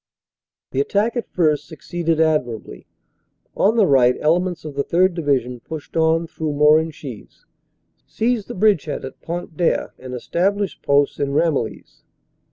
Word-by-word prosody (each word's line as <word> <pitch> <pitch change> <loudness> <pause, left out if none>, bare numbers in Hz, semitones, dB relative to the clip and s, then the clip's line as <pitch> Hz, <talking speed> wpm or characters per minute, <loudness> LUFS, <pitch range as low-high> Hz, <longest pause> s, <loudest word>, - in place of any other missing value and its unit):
The 135 - +1
attack 205 - 0
at 240 - -3
first 150 -4 +1
succeeded 165 0 -2
admirably. 125 - -1 0.7
On 215 +3 +3
the 215 - +5
right 125 -5 +4
ele 160 +3 +3
ments 180 -3 -4
of 150 - -6
the 140 0 -1
3rd. 180 +4 +2
Division 135 -7 -1
pushed 155 +4 -9
on 165 +1 +2
through 160 -2 -4
Morenchies, 150 -4 0 0.6
seized 230 -2 -1
the - - -7
bridgehead 190 -9 +1
at 130 - -10
Pont 170 -1 -5
d 175 - 0
Aire - - 0
and 130 0 -7
established 195 - -1
posts 140 0 +2
in 140 -1 -1
Ramillies. 145 -7 -1
160 Hz, 150 wpm, -21 LUFS, 140-175 Hz, 0.7 s, the